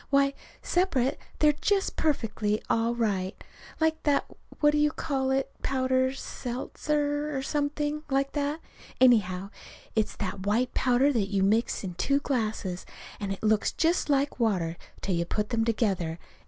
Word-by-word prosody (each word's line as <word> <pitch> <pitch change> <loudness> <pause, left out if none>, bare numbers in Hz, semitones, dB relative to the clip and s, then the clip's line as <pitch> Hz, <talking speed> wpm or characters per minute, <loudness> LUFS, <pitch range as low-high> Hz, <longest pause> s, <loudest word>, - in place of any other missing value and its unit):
Why, 275 0 +3 0.3
separate 290 -7 +1 0.2
they're 300 -1 +5
just 390 +6 0
perfectly 220 -8 0
all 230 +1 +2
right, 200 -5 0 0.4
like 320 0 +1
that 290 -2 +2
that - - -18 0.2
what 295 -1 +5
do 300 - +1
you 300 0 +4
call 270 -4 -1
it 265 0 0
powder? 260 -1 +2
sedlitzer, 290 +3 -2
or 265 - -2
something 295 +1 -1
like 275 0 +1
that. 290 +2 -2 0.4
Anyhow, 200 -6 +4 0.4
it's 220 -1 0
that 195 -2 -4
white 240 +4 +1
powder 260 +3 +3
that 205 -5 0
you 195 -1 +1
mix 215 +4 +1
in 185 -2 -4
two 275 +11 +1
glasses, 215 -9 -2 0.4
and 200 -1 -3
that 195 - -5
looks 215 -1 +3
just 330 0 +1
like 280 -1 +1
water 185 -8 +1 0.3
till 195 - -1
you 170 0 +1
put 210 +4 -2
them 230 -2 +1
together. 195 -8 0
255 Hz, 155 wpm, -28 LUFS, 210-290 Hz, 0.4 s, they're